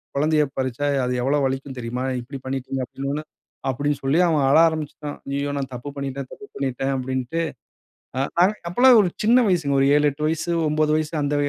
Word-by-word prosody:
குழந்தையைப் 150 -1 +1
பறிச்சா 130 +2 -1 0.2
அது 125 - -1
எவ்வளவு 140 +1 +2
வலிக்கும் 135 0 -5
தெரியுமா?" 120 +1 -3 0.2
இப்படி 135 +3 -8
பண்ணிட்டீங்க 135 0 -3
அப்பிடின்னு 135 +3 -5
சொன்னவுன்ன 150 +2 -4 0.4
அப்படின்னு 145 +2 -1
சொல்லி, 135 +5 +2
அவன் 155 -4 +2
அழ 140 - +5
ஆரம்பிச்சுட்டான். 150 -2 -5
"ஐய்யயோ! 140 +1 -1
நான் 135 -2 -4
தப்பு 125 +4 -6
பண்ணிட்டேன், 140 -1 -4
தப்பு 210 - -11
பண்ணிட்டேன்"அப்படின்டு. 130 +2 -2 1.3
அப்போல்லாம் 245 +5 +6
ஒரு 185 - +1
சின்ன 230 +4 +5
வயசுங்க 160 -6 +1
ஒரு 135 - +4
7, 150 0 +3
8 150 +2 -4
வயசு 165 +2 -2 0.2
9 155 0 +1
வயசு 155 0 -3
அந்த 145 +1 0
140 Hz, 165 wpm, -23 LUFS, 135-155 Hz, 1.3 s, அப்போல்லாம்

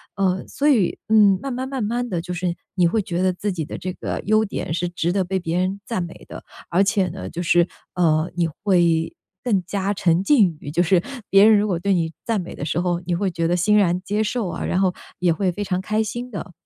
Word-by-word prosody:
呃， 190 -1 0
所 290 - 0
以， 225 -11 +3
嗯， 205 -3 +5
慢 275 - -4
慢 255 +1 -3
慢 265 -3 -3
慢 240 +3 -1
的， 175 - -1
就 180 +1 -5
是 175 0 -1 0.2
你 180 -2 +3
会 215 +5 +1
觉 180 -2 -3
得 185 - +3
自 205 +3 -3
己 165 -3 -3
的 - - -6
这 185 0 -4
个 - - -4
优 215 +1 +3
点， 195 -5 -4
是 175 +1 -1
值 175 -1 -1
得 195 -1 +1
被 190 +1 -2
别 170 0 -2
人 185 +2 -1
赞 225 -7 -2
美 170 - -10
的。 - - -9 0.3
而 185 +3 +3
且 195 -1 +1
呢， 170 - -6
就 170 - -5
是， 175 0 +4 0.3
呃， 160 -2 +2
你 170 -2 +1 0.2
会 170 -4 +2 0.3
更 200 -6 +1
加 200 +1 -1
沉 175 -2 +2
浸 195 - +3
于 145 - -8
就 175 +3 +2
是 180 0 +3 0.3
别 195 +1 +7
人 220 -1 +7
如 210 +1 +1
果 180 -4 -1
对 195 +3 +1
你 165 -2 0
赞 225 -4 0
美 180 - -8
的 150 - -5
时 175 - -1
候， 175 -1 0
你 175 - 0
会 190 +1 -1
觉 165 0 -1
得 175 - +2
欣 210 +4 +3
然 180 -3 +2
接 205 +3 -1
受 220 -3 -1
啊， - - -4
然 - - 0
后 185 -2 +2 0.3
也 175 -1 +3
会 180 +2 0
非 205 - -3
常 185 -2 -1
开 215 +4 0
心 240 +3 -5
的。 200 -4 -7
185 Hz, 270 characters per minute, -22 LUFS, 175-205 Hz, 0.3 s, 别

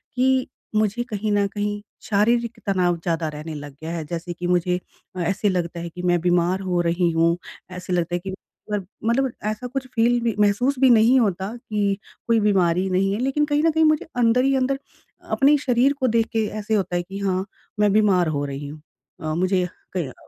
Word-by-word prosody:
कि, 260 0 +2 0.3
मुझे 215 +2 +1
कहीं 210 0 -2
न 205 -1 +3
कहीं 205 0 -3 0.2
शारीरिक 235 +3 +1
तनाव 180 -3 +2
ज़्यादा 165 -1 -2
रहने 155 +1 -7
लग 145 -1 -7
गया 160 +1 -5
है 170 -2 -3
जैसे 170 +2 -5
कि 175 +1 -4
मुझे 180 0 +2 0.4
अ, - - -5
ऐसे 195 +4 +1
लगता 175 -2 -2
है 170 0 -5
कि 180 +2 -8
मैं 175 -1 +2
बीमार 175 +1 +2
हो 180 -2 0
रही 170 +1 +1
हूँ। 165 +1 +2 0.4
ऐसे 180 0 -4
लगता 175 0 0
है - - -1
कि 190 +2 -6 0.4
वर 205 -2 -1 0.2
मतलब 255 +3 +1 0.2
ऐसा 215 +4 -4
कुछ 260 +1 -4
फील 240 +1 +3
भी 230 -3 0
महसूस 210 +7 +2
भी 265 -1 +6
नहीं 240 +2 +6
होता 195 -3 0
कि 210 -4 -1 0.3
कोई 230 -1 +4
बीमारी 190 -3 +2
नहीं 190 +1 +1
है 205 - -2
लेकिन 270 +4 +1
कहीं 295 0 +1
न - - +4
नहीं 320 - +4
मुझे 310 -1 +2
अंदर 245 +1 +3
ही 270 0 +3
अंदर 265 +1 0 0.5
अपने 285 +2 +5
शरीर 265 0 +2
को 260 - +2
देख 230 -1 +2
के 225 -1 +1
ऐसा 215 +1 -2
होता 185 -3 -2
है 175 - +1
कि 190 +3 -8
हाँ, 190 -1 0 0.3
मैं 210 -1 +4
बीमार 200 -5 +4
हो 145 -2 -1
रही 140 +1 -5
हूँ। 150 +1 -10 0.4
अ, 155 0 -2
मुझे 185 +1 +1 0.3
क 145 -8 -3
200 Hz, 205 wpm, -23 LUFS, 175-235 Hz, 0.5 s, भी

